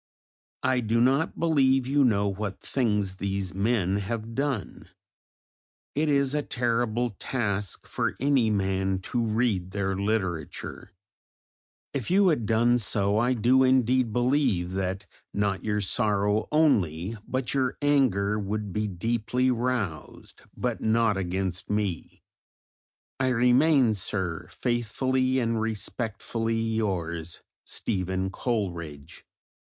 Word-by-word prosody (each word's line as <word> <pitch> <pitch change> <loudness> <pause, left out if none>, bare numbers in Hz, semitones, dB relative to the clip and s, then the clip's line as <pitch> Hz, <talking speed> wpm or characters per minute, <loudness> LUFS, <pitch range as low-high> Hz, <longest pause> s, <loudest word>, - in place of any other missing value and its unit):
I 130 0 +2
do 115 0 +1
not 135 +6 +2
believe 135 -6 +3
you 140 +2 +3
know 100 -5 +3
what 100 0 -4
things 105 -7 -1
these 100 -1 -2
men 100 -1 +1
have 110 +2 -4
done; 135 -4 -3 1.0
it 150 +2 +1
is 140 -1 +2
a 150 - +1
terrible 120 -2 0
task 105 -6 -2
for - - -2
any 135 -4 +3
man 95 -2 0
to 120 +5 -2
read 110 -5 0
their 95 0 -1
literature; 95 -6 -3 1.0
if 135 -5 -3
you 190 +1 +5
had 120 -10 0
done 120 +2 +3
so 100 -1 +1
I 120 +2 +2
do 125 +3 +4
indeed 130 -2 +3
believe 120 -7 +1
that 95 +1 -2 0.3
not 100 -2 0
your 105 -1 0
sorrow 105 0 +1
only 105 - +2
but 130 -1 -2
your 130 -2 0
anger 120 -8 +2
would 105 -1 -3
be 105 +2 -1
deeply 115 +6 0
roused, 115 - -3 0.2
but - - -2
not 110 -1 +2
against 95 0 -3
me. 105 -5 -3 1.0
I 130 - +2
remain, 125 +1 +4
Sir, 95 -4 -3
Faithfully 130 +2 0
and 115 -3 0
Respectfully 115 +1 -2
yours, 90 -7 -2 0.2
STEPHEN 95 -2 -2
COLERIDGE. 85 - -4
110 Hz, 115 wpm, -27 LUFS, 100-125 Hz, 1.0 s, you